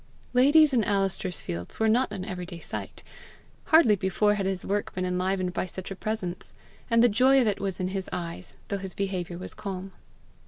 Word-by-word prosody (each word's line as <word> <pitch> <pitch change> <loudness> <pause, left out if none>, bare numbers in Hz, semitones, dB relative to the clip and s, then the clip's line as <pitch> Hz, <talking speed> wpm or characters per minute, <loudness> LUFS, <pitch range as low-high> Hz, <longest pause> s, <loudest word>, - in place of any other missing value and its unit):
Ladies 290 +4 +6
in 235 -3 +3
Alister's 195 -4 -1
fields 85 +1 -6
were 220 - +3
not 240 +4 +2
an 185 - -5
everyday 180 -3 -6
sight. - - -6 0.6
Hardly 315 -10 +6
before 195 +2 +2
had 200 -2 -1
his 190 -2 -2
work 205 +1 -1
been 185 0 -1
enlivened 180 0 -1
by 185 - -2
such 185 +1 -7
a - - -4
presence; 195 -4 -4 0.4
and 230 0 +5
the - - +7
joy 255 +5 +5
of 250 - +3
it 210 -2 0
was 195 -2 -3
in 185 0 -1
his 190 0 -4
eyes, 170 +1 -6
though 200 - -1
his 190 -1 -7
behaviour 185 -3 -3
was 185 - -7
calm. 195 -1 -6
195 Hz, 195 wpm, -27 LUFS, 185-220 Hz, 0.6 s, the